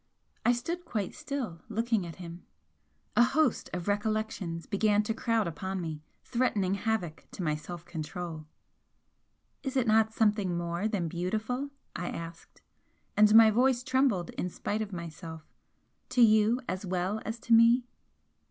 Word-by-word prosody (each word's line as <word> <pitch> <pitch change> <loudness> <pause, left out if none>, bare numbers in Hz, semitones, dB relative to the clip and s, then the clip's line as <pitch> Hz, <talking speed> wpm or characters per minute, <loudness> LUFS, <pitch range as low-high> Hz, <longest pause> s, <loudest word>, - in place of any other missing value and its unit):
I 240 - +5
stood 335 +9 -2
quite 210 - -3
still, 245 - -5
looking 225 -4 0
at 165 - -8
him. 170 -1 -9 0.7
A - - +6
host 280 0 +2
of 180 0 -4
recollections 205 -5 -1
began 210 +1 +2
to 225 - -1
crowd 225 -1 +1
upon 190 +4 -4
me, 160 -3 -4 0.2
threatening 210 -6 +1
havoc 200 -6 -2
to 185 - -5
my 155 -2 +1
self 170 +3 -7
control. 165 -1 -6 1.1
"Is 270 -1 -3
it 255 - +3
not 220 0 +4
something 210 -5 +1
more 170 +4 -1
than 195 -6 -1
beautiful?" 220 - -2 0.3
I 175 0 -3
asked, 165 0 -8 0.5
and 210 +1 +6
my 225 -1 +9
voice 250 +2 +3
trembled 255 -10 +1
in 180 - -3
spite 210 +4 -3
of 210 -2 -4
myself 165 -2 -7 0.7
"To 250 - +2
you 220 +2 +5
as 185 +2 -3
well 185 +3 -1
as 225 +2 -4
to 235 - +1
me?" 230 +2 +6
210 Hz, 150 wpm, -30 LUFS, 175-230 Hz, 1.1 s, my